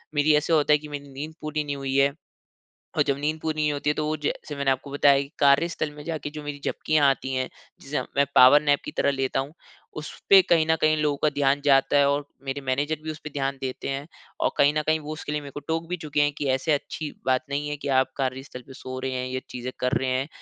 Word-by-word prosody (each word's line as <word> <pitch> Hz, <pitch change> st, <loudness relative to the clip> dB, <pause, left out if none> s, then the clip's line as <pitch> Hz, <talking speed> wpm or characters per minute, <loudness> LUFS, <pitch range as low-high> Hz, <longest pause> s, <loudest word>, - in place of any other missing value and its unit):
मेरी 145 Hz, +1 st, +4 dB
ऐसा 150 Hz, +3 st, +1 dB
होता 150 Hz, -1 st, +4 dB
है -, -, +6 dB
कि 150 Hz, -, -10 dB
मेरी 145 Hz, -1 st, -7 dB
नींद 150 Hz, +4 st, -6 dB
पूरी 155 Hz, 0 st, -2 dB
नहीं 145 Hz, -1 st, -3 dB
हुई 135 Hz, -1 st, -3 dB
है। 140 Hz, 0 st, +4 dB, 0.9 s
और -, -, +5 dB
जब 140 Hz, -, 0 dB
नींद 155 Hz, +2 st, -1 dB
पूरी 155 Hz, 0 st, -2 dB
नहीं 150 Hz, -1 st, +1 dB
होती 145 Hz, +1 st, -1 dB
है -, -, +1 dB
तो 155 Hz, -, -2 dB
वो 155 Hz, +1 st, -1 dB
जैसे 150 Hz, 0 st, -4 dB
मैंने 140 Hz, -1 st, +1 dB
आपको 135 Hz, +2 st, -2 dB
बताया 140 Hz, 0 st, +4 dB
की 140 Hz, 0 st, -6 dB
कार्यस्थल 150 Hz, +3 st, +3 dB
में 150 Hz, -, -9 dB
जाके 155 Hz, -2 st, -4 dB
जो 150 Hz, 0 st, -8 dB
मेरी 145 Hz, -1 st, -6 dB
झपकियाँ 150 Hz, -2 st, +2 dB
आती 135 Hz, 0 st, -2 dB
हैं 130 Hz, 0 st, -1 dB, 0.3 s
जिसे 145 Hz, +2 st, -3 dB, 0.2 s
मैं 140 Hz, -, +5 dB
पावरनैप 145 Hz, +2 st, +6 dB
की -, -, -5 dB
तरह -, -, +3 dB
लेता 135 Hz, -1 st, 0 dB
हूँ 135 Hz, +2 st, -6 dB, 0.5 s
उसपे 190 Hz, +5 st, +4 dB
कहीं 165 Hz, -2 st, +5 dB
न 160 Hz, -, +4 dB
कहीं 155 Hz, 0 st, +3 dB
लोगों 145 Hz, -1 st, +1 dB
का 155 Hz, -, +5 dB
ध्यान 140 Hz, 0 st, +2 dB
जाता 135 Hz, 0 st, +4 dB
है 140 Hz, -1 st, +5 dB
और 145 Hz, +1 st, 0 dB, 0.2 s
मेरे 135 Hz, +1 st, -3 dB
मैनेजर 140 Hz, +4 st, -1 dB
भी 160 Hz, -, -3 dB
उसपे 150 Hz, 0 st, -7 dB
ध्यान 140 Hz, -1 st, -2 dB
देते 130 Hz, -1 st, -4 dB
हैं। 135 Hz, +1 st, -3 dB, 0.3 s
और -, -, +2 dB
कहीं 145 Hz, +1 st, +5 dB
न -, -, +1 dB
कहीं 155 Hz, 0 st, +2 dB
वो 150 Hz, 0 st, -6 dB
उसके 155 Hz, -1 st, -6 dB
लिए 150 Hz, -, -1 dB
मेरे 140 Hz, -1 st, -9 dB
को 145 Hz, -, -7 dB
टोक 165 Hz, +1 st, -1 dB
भी 180 Hz, -, -2 dB
चुके 150 Hz, -3 st, -2 dB
है 145 Hz, -, +3 dB
कि 145 Hz, -, -2 dB
"ऐसे 135 Hz, +4 st, 0 dB
अच्छी 150 Hz, +1 st, -3 dB, 0.2 s
बात 130 Hz, -1 st, +2 dB
नहीं 145 Hz, +1 st, -2 dB
है 150 Hz, -, -3 dB
की 145 Hz, -, -6 dB
आप 130 Hz, 0 st, -2 dB
कार्यस्थल 130 Hz, -1 st, -4 dB
पर 135 Hz, -, -12 dB
सो 130 Hz, 0 st, -7 dB
रहे 130 Hz, 0 st, -3 dB
हैं, 125 Hz, 0 st, -2 dB
ये 130 Hz, 0 st, -3 dB
चीज़ें 125 Hz, +1 st, -5 dB
कर 125 Hz, 0 st, 0 dB
रहे 130 Hz, -, -2 dB
हैं। 130 Hz, +3 st, -1 dB
145 Hz, 260 wpm, -25 LUFS, 135-150 Hz, 0.9 s, है